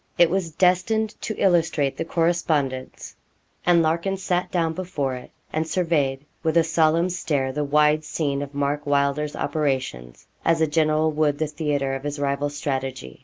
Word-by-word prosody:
It 170 Hz, -1 st, +5 dB
was 185 Hz, -3 st, 0 dB
destined 185 Hz, +6 st, +2 dB
to 215 Hz, -, -4 dB
illustrate 165 Hz, -6 st, +2 dB
the 165 Hz, -, -3 dB
correspondence, 160 Hz, -6 st, -1 dB, 0.5 s
and 170 Hz, -2 st, +5 dB
Larkin 170 Hz, +5 st, 0 dB
sat 180 Hz, -1 st, -1 dB
down 165 Hz, -2 st, 0 dB
before 160 Hz, -7 st, -3 dB
it 125 Hz, -1 st, -8 dB, 0.2 s
and 160 Hz, +1 st, -1 dB
surveyed, 150 Hz, -6 st, 0 dB, 0.2 s
with 160 Hz, 0 st, +1 dB
a 165 Hz, -, +6 dB
solemn 165 Hz, +2 st, +2 dB
stare, 145 Hz, -7 st, -1 dB
the 150 Hz, +2 st, -2 dB
wide 150 Hz, +1 st, +3 dB
scene 145 Hz, -2 st, -2 dB
of 140 Hz, 0 st, -7 dB
Mark 145 Hz, +1 st, -1 dB
Wylder's 145 Hz, +1 st, +1 dB
operations, 130 Hz, -, -2 dB, 0.2 s
as 165 Hz, -1 st, +2 dB
a 160 Hz, -, +4 dB
general 155 Hz, 0 st, +2 dB
would 150 Hz, -1 st, +1 dB
the 155 Hz, -, 0 dB
theatre 145 Hz, -3 st, -1 dB
of 135 Hz, -, -3 dB
his 145 Hz, +1 st, -4 dB
rival's 145 Hz, +1 st, -1 dB
strategy. 130 Hz, -, -4 dB
155 Hz, 165 wpm, -23 LUFS, 140-165 Hz, 0.5 s, a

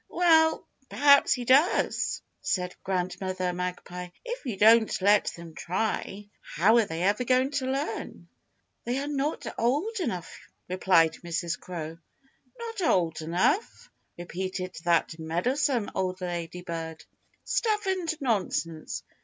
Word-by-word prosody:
"Well, 320 Hz, -2 st, +4 dB, 0.2 s
perhaps 280 Hz, 0 st, +5 dB
he 245 Hz, -2 st, -5 dB
does!" 280 Hz, -, +2 dB, 0.2 s
said 180 Hz, -1 st, -1 dB
Grandmother 185 Hz, 0 st, -2 dB
Magpie. 180 Hz, 0 st, -5 dB, 0.2 s
"If 485 Hz, -, -5 dB
you 220 Hz, -5 st, -3 dB
don't 220 Hz, +2 st, +5 dB
let 200 Hz, +2 st, +4 dB
them 170 Hz, -1 st, -11 dB
try 200 Hz, +3 st, -3 dB
how 205 Hz, +9 st, +3 dB
are 230 Hz, -, +4 dB
they 165 Hz, -1 st, -4 dB
ever 205 Hz, +6 st, +2 dB
going 255 Hz, +2 st, +2 dB
to 275 Hz, -3 st, -1 dB
learn?" 275 Hz, +4 st, -4 dB, 0.6 s
"They 245 Hz, +2 st, -1 dB
are 275 Hz, -, -2 dB
not 290 Hz, +1 st, -2 dB
old 305 Hz, -, 0 dB
enough," 210 Hz, -, -4 dB, 0.3 s
replied 180 Hz, -3 st, +3 dB
Mrs. 170 Hz, +1 st, -2 dB
Crow. 165 Hz, -2 st, -7 dB, 0.6 s
"Not 455 Hz, -3 st, -6 dB
old 170 Hz, -, +1 dB
enough?" 175 Hz, -, 0 dB, 0.3 s
repeated 185 Hz, +1 st, -5 dB
that 170 Hz, -1 st, +1 dB
meddlesome 230 Hz, -, 0 dB
old 185 Hz, -1 st, -2 dB
lady 175 Hz, 0 st, -4 dB
bird. 165 Hz, -3 st, -6 dB, 0.4 s
"Stuff 430 Hz, -2 st, 0 dB
and 370 Hz, -4 st, 0 dB
nonsense! 185 Hz, -, -2 dB
190 Hz, 125 wpm, -27 LUFS, 175-275 Hz, 0.6 s, perhaps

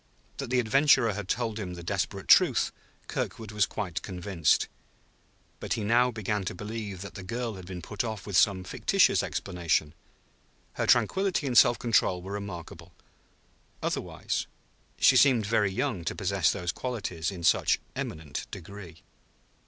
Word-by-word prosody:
That 140 Hz, -3 st, -5 dB
the 125 Hz, 0 st, +2 dB
adventurer 130 Hz, -1 st, +4 dB
had 100 Hz, -1 st, -5 dB
told 115 Hz, -2 st, -1 dB
him 90 Hz, -4 st, -5 dB
the 85 Hz, -, -9 dB
desperate -, -, -3 dB
truth, -, -, +5 dB, 0.3 s
Kirkwood 110 Hz, -2 st, -4 dB
was 105 Hz, -2 st, +2 dB
quite 95 Hz, -6 st, -4 dB
convinced; 90 Hz, -4 st, 0 dB, 0.9 s
but -, -, -2 dB
he 110 Hz, -, -2 dB
now 120 Hz, +4 st, +4 dB
began 105 Hz, -3 st, -2 dB
to 90 Hz, -, -4 dB
believe 105 Hz, -2 st, -6 dB
that 100 Hz, -, -8 dB
the 95 Hz, -, -8 dB
girl 115 Hz, +5 st, -4 dB
had 95 Hz, -3 st, -10 dB
been 90 Hz, -2 st, -7 dB
put 105 Hz, -, -3 dB
off 110 Hz, -4 st, -5 dB
with 100 Hz, -, -4 dB
some 95 Hz, 0 st, +4 dB
fictitious -, -, +2 dB
explanation. 85 Hz, -5 st, -1 dB, 0.8 s
Her -, -, -2 dB
tranquillity 190 Hz, -5 st, +2 dB
and 130 Hz, -3 st, -1 dB
self 120 Hz, 0 st, +7 dB
control 95 Hz, -7 st, +1 dB
were 95 Hz, -, -7 dB
remarkable, 90 Hz, -4 st, -8 dB, 0.9 s
otherwise; -, -, -2 dB, 0.5 s
she 135 Hz, -, +5 dB
seemed 125 Hz, -4 st, +5 dB
very 105 Hz, -2 st, +2 dB
young 115 Hz, -4 st, -2 dB
to -, -, -2 dB
possess -, -, +1 dB
those 90 Hz, -1 st, -2 dB
qualities 95 Hz, -9 st, -3 dB
in 90 Hz, -4 st, -7 dB
such -, -, +3 dB, 0.2 s
eminent 80 Hz, -2 st, -5 dB
degree. 95 Hz, -3 st, -10 dB
100 Hz, 150 wpm, -28 LUFS, 90-115 Hz, 0.9 s, self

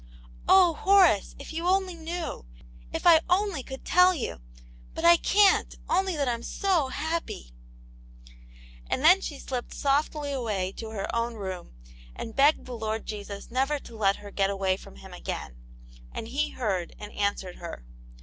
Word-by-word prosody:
"Oh, 365 Hz, -3 st, +7 dB
Horace, 370 Hz, -, +4 dB
if 280 Hz, +3 st, -9 dB
you 335 Hz, +2 st, -2 dB
only 375 Hz, 0 st, +2 dB
knew! 330 Hz, -, -5 dB, 0.4 s
If -, -, -4 dB
I 330 Hz, -2 st, +8 dB
only 370 Hz, -4 st, +1 dB
could 265 Hz, +1 st, -9 dB
tell 360 Hz, +1 st, +5 dB
you! 240 Hz, -, -4 dB, 0.5 s
But 325 Hz, -, -2 dB
I 340 Hz, 0 st, +9 dB
can't, 400 Hz, +3 st, +3 dB
only 380 Hz, -1 st, +1 dB
that 280 Hz, -2 st, 0 dB
I'm 235 Hz, -1 st, -1 dB
so 350 Hz, +1 st, 0 dB
happy! 290 Hz, -, -4 dB, 0.7 s
" -, -, -21 dB
And 260 Hz, -, -1 dB
then 360 Hz, +5 st, +7 dB
she 290 Hz, -, -5 dB
slipped 250 Hz, -3 st, -5 dB
softly 290 Hz, +1 st, 0 dB
away 210 Hz, -8 st, -2 dB
to 225 Hz, -, -6 dB
her 215 Hz, 0 st, -4 dB
own 230 Hz, 0 st, -1 dB
room, 185 Hz, -, -7 dB, 0.4 s
and 225 Hz, -, -7 dB
begged 285 Hz, +3 st, +4 dB
the 255 Hz, -, -7 dB
Lord 220 Hz, -1 st, -3 dB
Jesus 205 Hz, -1 st, -7 dB
never 270 Hz, +4 st, +1 dB
to 235 Hz, -4 st, -12 dB
let 200 Hz, -2 st, +2 dB
her 205 Hz, 0 st, -11 dB
get 195 Hz, -1 st, +1 dB
away 195 Hz, -1 st, 0 dB
from 185 Hz, -, -13 dB
Him 65 Hz, -, -12 dB
again, -, -, -6 dB, 0.6 s
and 225 Hz, -, -6 dB
He 290 Hz, +4 st, 0 dB
heard, 195 Hz, -8 st, -3 dB
and 210 Hz, -, -9 dB
answered 200 Hz, -3 st, -2 dB
her. 170 Hz, -, -8 dB
255 Hz, 170 wpm, -27 LUFS, 200-330 Hz, 0.7 s, I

